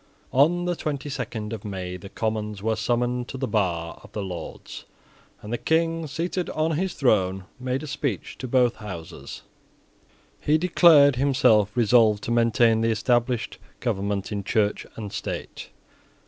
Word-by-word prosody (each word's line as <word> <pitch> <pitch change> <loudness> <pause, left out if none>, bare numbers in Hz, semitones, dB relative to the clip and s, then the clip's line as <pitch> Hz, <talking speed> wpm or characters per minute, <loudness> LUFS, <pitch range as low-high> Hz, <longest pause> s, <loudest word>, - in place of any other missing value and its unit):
On 170 +7 +3
the 175 0 0
twenty 145 -3 -4
second 115 -5 -4
of 110 - -6
May 95 -3 -5
the 90 +2 -9
Commons 105 -2 -3
were 110 0 +1
summoned 120 +3 0
to 135 - -7
the 130 0 -2
bar 85 -7 -1
of - - -15
the 105 - -3
Lords; 90 -4 -7 0.6
and 105 +3 -5
the 120 - -1
King, 165 0 +1
seated 170 +5 -3
on 155 +1 0
his 180 +4 -1
throne, 95 -8 +2 0.2
made 130 +2 -2
a - - -4
speech 140 - -3
to 130 - -4
both 125 -1 +2
Houses. 85 -8 -8 1.0
He 150 +1 +2
declared 155 -5 +6
himself 130 -7 +4
resolved 110 -2 +4
to 115 - -3
maintain 115 -1 +3
the 115 - +2
established 120 +1 0 0.2
government 100 -4 -2
in 100 -1 -3
Church 105 0 0
and 105 -3 -7
State. - - -5
115 Hz, 155 wpm, -25 LUFS, 105-140 Hz, 1.0 s, declared